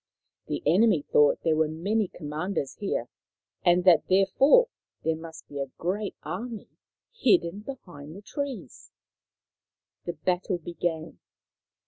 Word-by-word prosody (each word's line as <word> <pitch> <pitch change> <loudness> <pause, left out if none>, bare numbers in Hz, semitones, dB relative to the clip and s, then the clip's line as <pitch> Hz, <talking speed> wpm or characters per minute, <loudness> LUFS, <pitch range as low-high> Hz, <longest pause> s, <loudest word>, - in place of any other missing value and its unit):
The - - -3
enemy 180 0 +4
thought 145 -1 +5
there 160 -2 +3
were 160 0 +2
many 195 +7 0
commanders 155 -1 -4
here, 200 - -2 0.6
and 175 0 +4
that 175 -3 +5
therefore 230 - +5 0.4
there 160 0 +1
must 160 -1 -10
be 145 - -7
a 135 -1 -3
great 200 +4 -2
army 225 +3 -6 0.4
hidden 275 - +2
behind 175 - -9
the 200 - -11
trees. 260 - -6 1.2
The 175 - -3
battle 180 +3 -1
began. 170 -1 -4
180 Hz, 120 wpm, -27 LUFS, 160-205 Hz, 1.2 s, thought